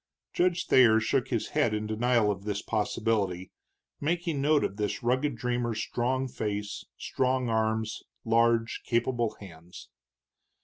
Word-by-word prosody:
Judge 175 -1 +1
Thayer 115 -4 +6
shook - - 0
his - - -2
head 105 - +1
in 105 0 -3
denial 110 0 +2
of 100 -1 -6
this 105 -1 -3
possibility, 105 -4 -1 0.5
making 165 -1 -1
note 150 +1 +3
of 100 - -3
this 105 +4 -2
rugged 130 +3 +1
dreamer's 120 -1 -2
strong 130 +4 -1
face, 105 -3 -4
strong 130 -1 0
arms, 110 0 0 0.2
large, 115 0 +2
capable 120 -1 0
hands. 85 -3 -12
115 Hz, 130 wpm, -28 LUFS, 105-130 Hz, 0.5 s, Thayer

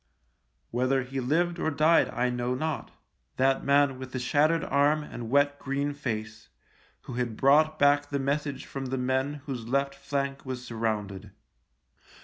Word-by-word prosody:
Whether 130 +2 +1
he 135 +2 -5
lived 170 +7 0
or - - +1
died 160 +2 +4
I 125 +1 0
know 125 +1 -1
not 155 +3 -3 0.2
— - - -46
that 135 +1 +2
man 140 -2 +3
with 130 -1 -8
the - - -2
shattered 155 +6 +2
arm 145 +2 +2
and 120 -5 -7
wet 145 +2 +2
green 140 +1 -2
face, 110 -6 -5 0.5
who - - -9
had 120 -3 -2
brought 155 +3 +4
back 145 0 +3
the 140 - -1
message 140 0 -2
from 135 -1 -5
the 130 +1 -2
men 130 +3 -1
whose 125 -6 -5
left 140 +2 0
flank 140 0 -3
was 130 -1 -6
sur 115 - -7
rounded. 105 -3 -2
135 Hz, 165 wpm, -28 LUFS, 125-145 Hz, 0.5 s, died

